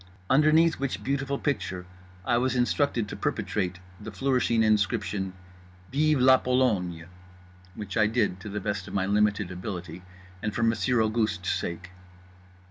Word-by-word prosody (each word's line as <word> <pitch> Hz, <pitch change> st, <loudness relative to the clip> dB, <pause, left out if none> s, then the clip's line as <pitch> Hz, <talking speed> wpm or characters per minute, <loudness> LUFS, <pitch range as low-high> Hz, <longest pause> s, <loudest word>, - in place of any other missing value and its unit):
Underneath 155 Hz, +4 st, +4 dB
which 135 Hz, -1 st, -3 dB
beautiful 140 Hz, +1 st, -1 dB
picture 95 Hz, -12 st, -2 dB, 0.4 s
I 120 Hz, -1 st, +2 dB
was 130 Hz, +1 st, 0 dB
instructed 125 Hz, -2 st, +1 dB
to -, -, -6 dB
perpetrate 90 Hz, -3 st, -2 dB, 0.2 s
the 110 Hz, +1 st, -8 dB
flourishing 115 Hz, +1 st, +1 dB
inscription 100 Hz, -3 st, 0 dB, 0.6 s
"Vive 150 Hz, +1 st, +2 dB
la 130 Hz, +1 st, +7 dB
Pologne" 105 Hz, -11 st, 0 dB, 0.7 s
which 100 Hz, -3 st, -6 dB
I 110 Hz, -2 st, +4 dB
did 110 Hz, -5 st, 0 dB
to 100 Hz, -, -8 dB
the 105 Hz, +1 st, -3 dB
best 105 Hz, -2 st, -3 dB
of -, -, -7 dB
my 95 Hz, -1 st, +1 dB
limited 105 Hz, -1 st, +1 dB
ability 90 Hz, -2 st, -6 dB, 0.4 s
and 105 Hz, -2 st, -3 dB
for 115 Hz, -, 0 dB
Monsieur 115 Hz, +1 st, +2 dB
Auguste's 110 Hz, -5 st, 0 dB
sake. 90 Hz, +2 st, -4 dB
110 Hz, 140 wpm, -27 LUFS, 95-130 Hz, 0.7 s, la